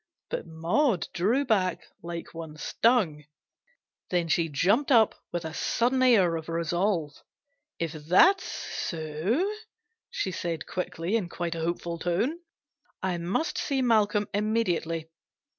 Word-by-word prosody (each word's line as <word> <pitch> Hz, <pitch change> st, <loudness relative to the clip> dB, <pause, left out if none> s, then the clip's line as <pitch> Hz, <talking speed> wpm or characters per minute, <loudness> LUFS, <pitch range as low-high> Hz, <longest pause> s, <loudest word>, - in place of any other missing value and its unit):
But -, -, -3 dB
Maud 175 Hz, -, +1 dB
drew 230 Hz, +11 st, +2 dB
back 190 Hz, -7 st, +1 dB, 0.2 s
like 170 Hz, 0 st, -6 dB
one 160 Hz, -2 st, -8 dB
stung; 185 Hz, -6 st, +2 dB, 0.9 s
then 175 Hz, -2 st, 0 dB
she 165 Hz, 0 st, +2 dB
jumped 200 Hz, -, +2 dB
up 225 Hz, -4 st, +6 dB, 0.2 s
with 175 Hz, -1 st, -3 dB
a 160 Hz, -, -5 dB
sudden 250 Hz, +8 st, +1 dB
air 195 Hz, -10 st, +5 dB
of 160 Hz, 0 st, -8 dB
resolve. 170 Hz, -1 st, 0 dB, 0.3 s
" 285 Hz, +2 st, -52 dB
If 165 Hz, -2 st, -2 dB
that's 180 Hz, -, +4 dB
so," 165 Hz, -, -2 dB, 0.6 s
she 195 Hz, -, -2 dB
said 170 Hz, -3 st, -3 dB
quickly, 180 Hz, +1 st, -3 dB
in 200 Hz, -6 st, -1 dB
quite 175 Hz, -1 st, -3 dB
a 165 Hz, -, -5 dB
hopeful 170 Hz, 0 st, -2 dB
tone, 205 Hz, -, 0 dB, 0.3 s
" -, -, -42 dB
I 180 Hz, -2 st, 0 dB
must 185 Hz, -, -1 dB
see 270 Hz, -3 st, 0 dB
Malcolm 210 Hz, -3 st, +3 dB
immediately. 185 Hz, -7 st, 0 dB
180 Hz, 135 wpm, -27 LUFS, 165-230 Hz, 0.9 s, up